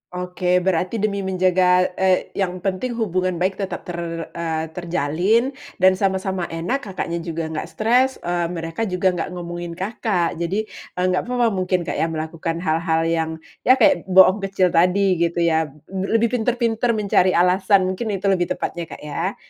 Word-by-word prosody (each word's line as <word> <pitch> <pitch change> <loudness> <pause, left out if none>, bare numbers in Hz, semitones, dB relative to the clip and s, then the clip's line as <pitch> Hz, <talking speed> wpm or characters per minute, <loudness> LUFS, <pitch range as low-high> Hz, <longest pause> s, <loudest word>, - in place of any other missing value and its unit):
Oke. 180 0 -5 0.2
Berarti 185 +3 0
demi 200 -2 0
menjaga, 185 -1 +2
eee, 190 -1 +2
yang 180 -2 -3
penting 200 +6 -2
hubungan 185 -5 -1
baik 185 +3 -1
tetap 190 -3 -4
ter 175 -1 -6 0.3
eee, 165 -2 -2
terjalin 180 - 0 0.3
dan 185 0 +5
sama-sama 190 -2 -1
enak. 170 +11 -2
Kakaknya 190 -7 -4
juga 165 -1 -4
enggak 155 - -4
stres, 250 +4 +2
eee, 175 -1 0
mereka 165 +5 -4
juga 180 0 +1
nggak 175 -2 -3
ngomongin 175 -1 -6
Kakak. 185 -3 -1
Jadi, 185 +6 -1 0.3
eee, 180 - 0
nggak 180 - 0
papa 245 -1 +2
mungkin, 185 -2 0
Kak, - - -4
ya 165 - +2
melakukan 160 +1 -4
hal-hal 160 0 +1
yang, 165 -1 0 0.4
ya 255 - +8
kek 290 -5 +3
bohong 190 +1 +6
kecil 185 -2 +1
tadi 180 +2 +3
gitu 170 0 +1
ya? 160 -1 +2
B 150 +7 -8
lebih 230 0 +2
pinter-pinter 235 0 0
mencari 195 -3 +2
alasan, 185 +2 +4
mungkin 205 +5 -4
itu 195 +1 +1
lebih 180 -2 +1
tepatnya, 170 - -4
Kak, - - -10
ya? 165 +6 -3
185 Hz, 165 wpm, -21 LUFS, 170-195 Hz, 0.4 s, ya